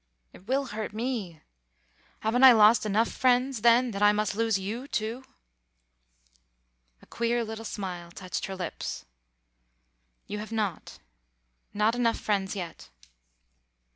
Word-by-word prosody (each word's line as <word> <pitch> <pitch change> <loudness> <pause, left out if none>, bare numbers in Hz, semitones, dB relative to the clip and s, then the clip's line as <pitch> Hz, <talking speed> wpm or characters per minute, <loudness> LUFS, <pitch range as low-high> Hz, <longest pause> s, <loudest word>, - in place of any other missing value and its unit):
It 190 - -17
will 270 +2 +1
hurt 215 -1 -4
me. 220 -8 -4 0.8
Haven't 235 +4 +1
I 260 -2 +11
lost 215 0 +5
enough 215 +3 +2
friends, 255 -1 +1
then, 240 +2 +4
that 200 -1 -5
I 205 0 +6
must 210 -1 -1
lose 225 -1 +1
you, 220 +8 -5
too?" 230 +1 -3 1.8
A - - -15
queer 235 0 -1
little 225 0 -6
smile 185 -5 -6
touched 185 +1 -5
her 195 - -5
lips. 180 -3 -5 1.2
"You 210 - -5
have 215 +1 -8
not. 210 -6 -3 0.7
Not 210 +2 +1
enough 235 -1 +1
friends 200 -2 -1
yet. 170 - -7
215 Hz, 130 wpm, -27 LUFS, 200-235 Hz, 1.8 s, I